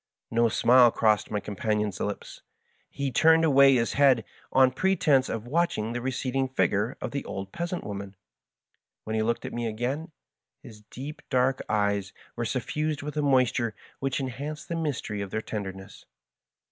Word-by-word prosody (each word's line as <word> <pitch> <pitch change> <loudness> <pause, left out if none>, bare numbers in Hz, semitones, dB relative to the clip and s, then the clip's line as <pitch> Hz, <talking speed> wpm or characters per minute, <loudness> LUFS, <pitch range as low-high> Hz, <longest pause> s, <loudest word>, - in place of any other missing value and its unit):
Ko 115 0 +3
smile 120 +2 +6
crossed 110 -3 +2
m 105 - 0
j - - -3
companion's 105 -1 -2
lips. 105 0 -5 0.5
He 140 -1 -3
tnmed 160 +5 +5
away 140 -3 +6
his 115 -2 +1
head, 135 -5 +4 0.3
on 130 -1 +5
pretense 150 -4 +2
of 115 0 -4
watching 130 -6 0
the 120 - -3
receding 130 +1 -1
figm:e 115 -2 +1
of - - -4
the 140 - -3
old 95 0 -6
peasant 170 +1 -4
woman. 100 -1 -6 0.9
When 110 - -3
he 110 - +1
looked 115 +2 -1
at - - -6
me 120 -1 -2
again, 125 +9 -3 0.5
his 105 -2 -12
deep 140 +4 -8
dark 130 0 +2
eyes 100 -2 0 0.2
were 120 - -2
soSnsed 150 +5 -2
with 150 +1 -5
a 150 - 0
moisture 130 -5 +2 0.2
which 135 0 -1
en 135 -1 -2
hanced 145 +5 -7
the 170 - -2
mystery 140 -10 -3
of 100 - -4
their 110 - -2
tenderness. 100 -2 -7
125 Hz, 170 wpm, -27 LUFS, 105-140 Hz, 0.9 s, smile